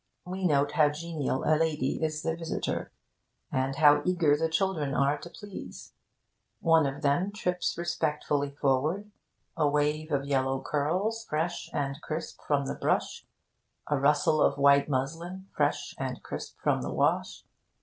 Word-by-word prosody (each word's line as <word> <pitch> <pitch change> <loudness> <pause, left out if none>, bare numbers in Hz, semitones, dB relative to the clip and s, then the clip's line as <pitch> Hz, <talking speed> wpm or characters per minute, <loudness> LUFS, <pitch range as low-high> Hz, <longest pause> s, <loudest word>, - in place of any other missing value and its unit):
We 185 +1 -3
note 145 -2 +2
how 150 -2 +4
genial 150 -3 -3
a 155 - +3
lady 155 -4 0
is 155 -1 -1
the 165 0 0
visitor, 165 -1 -3 0.6
and 130 +1 0
how 145 0 +6
eager 170 -5 +3
the 160 +2 0
children 160 -5 0
are 140 +2 +3
to 170 - -9
please. 205 +2 -10 0.7
One 165 -3 +4
of 140 +3 -5
them 150 +8 +2
trips 180 -4 -2
respectfully 150 -4 -1
forward 145 +9 0 0.4
a 150 -4 +2
wave 150 +2 0
of 140 -1 0
yellow 135 -1 +1
curls 185 +13 -1
fresh 165 +3 -2
and 140 +1 -2
crisp 160 +2 -5
from 140 -2 +2
the - - -2
brush, - - -1 0.6
a 145 -2 +2
rustle 150 +3 +3
of - - +3
white 140 +1 +5
muslin 165 +8 -3
fresh - - 0
and - - -4
crisp - - -7
from - - +2
the - - -3
wash. - - 0
150 Hz, 150 wpm, -29 LUFS, 140-170 Hz, 0.7 s, how